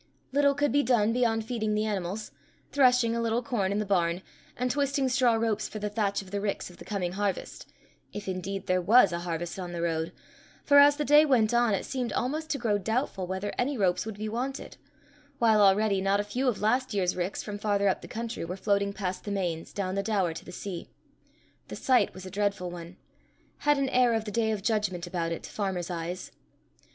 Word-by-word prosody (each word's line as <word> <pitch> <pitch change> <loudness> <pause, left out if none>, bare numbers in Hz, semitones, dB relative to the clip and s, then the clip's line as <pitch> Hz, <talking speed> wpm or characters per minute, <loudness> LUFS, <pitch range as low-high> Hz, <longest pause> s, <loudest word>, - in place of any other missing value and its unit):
Little 280 0 +3
could 290 0 +1
be 285 - +4
done 230 -5 +2
beyond 225 -3 +1
feeding 220 -3 -1
the 215 +1 +1
animals, 205 0 -3 0.4
threshing 250 -4 +4
a 235 - -1
little 230 +1 0
corn 205 -6 -1
in 200 - 0
the 210 - -1
barn, 180 -2 +1 0.3
and 250 0 0
twisting 280 -1 +1
straw 250 -2 +3
ropes 220 -2 0
for - - -7
the 210 0 -3
thatch 200 -2 0
of 185 - -15
the 200 0 -2
ricks 200 -3 -3
of 175 - -16
the - - -12
coming 190 -4 -2
harvest 200 0 -3 0.4
if 205 -1 -7
indeed 190 +1 -4
there 185 0 +1
was 205 +1 +6
a 170 - -2
harvest 175 +1 -4
on 175 -1 -5
the 170 - -3
road, 165 -1 -1 0.5
for, 285 0 +7
as 285 0 +7
the 295 0 -2
day 295 +1 +7
went 240 -7 +3
on, 235 -3 +3
it - - -4
seemed 255 -3 -3
almost 310 +5 -2
to 280 - 0
grow 220 -5 0
doubtful 220 -2 -2
whether 190 +2 -3
any 265 +2 0
ropes 185 -4 +1
would 220 -2 -7
be 215 +1 -4
wanted; 255 +5 -4 0.6
while 220 -5 +4
already 200 0 +4
not 195 +1 +2
a - - +1
few 245 +6 -2
of 240 -5 0
last 245 +2 +1
year's 185 -2 +1
ricks, 180 +2 -3
from 205 -1 -6
farther 200 -1 +1
up 190 - +1
the - - -9
country, 230 -1 -5
were 180 +3 -5
floating 200 0 +1
past 185 -2 -4
the - - -6
Mains, 175 -5 -2
down 185 -2 -3
the 200 - 0
Daur 195 -5 0
to - - -8
the - - -10
sea. 180 -1 -6 0.8
The - - -7
sight 255 -2 +3
was 185 0 -9
a 185 - -8
dreadful 200 -2 -1
one 175 0 -9 0.6
had 295 0 +3
an 275 -1 0
air 245 -2 +3
of 220 -1 -2
the 210 - -5
day 220 +1 +1
of 210 -3 -2
judgment 210 -6 0
about 170 -1 -2
it 165 - -4
to - - -9
farmers' 190 -4 -3
eyes. 175 +2 -5
205 Hz, 225 wpm, -28 LUFS, 185-240 Hz, 0.8 s, for